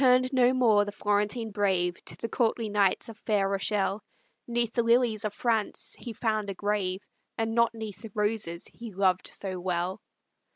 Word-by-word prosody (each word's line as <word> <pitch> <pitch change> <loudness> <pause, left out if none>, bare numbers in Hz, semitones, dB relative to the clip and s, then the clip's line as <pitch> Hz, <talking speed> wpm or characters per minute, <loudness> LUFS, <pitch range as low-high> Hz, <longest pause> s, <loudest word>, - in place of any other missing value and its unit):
But - - +5
returned 255 +1 +4
no 250 -1 +5
more 230 -5 +4
the 205 - -5
Florentine 210 +2 0
brave 190 -4 0
To - - -7
the 230 - -3
courtly 230 -1 0
knights 200 -2 +2
of 225 -2 -10
fair 205 -3 +1
Rochelle; 195 +1 0 0.5
'Neath 235 -1 0
the 240 - +2
lilies 230 -2 +3
of 210 - 0
France 220 0 -1
he 240 - -6
found 215 -2 -1
a 195 - -4
grave, 200 -1 -1 0.3
And 225 0 -1
not 235 0 +3
'neath 215 -3 -7
the 225 - -8
roses 210 -5 -1
he 235 -2 -8
loved 185 -1 +1
so 185 -2 -5
well. 180 +2 -2
210 Hz, 180 wpm, -28 LUFS, 195-230 Hz, 0.5 s, But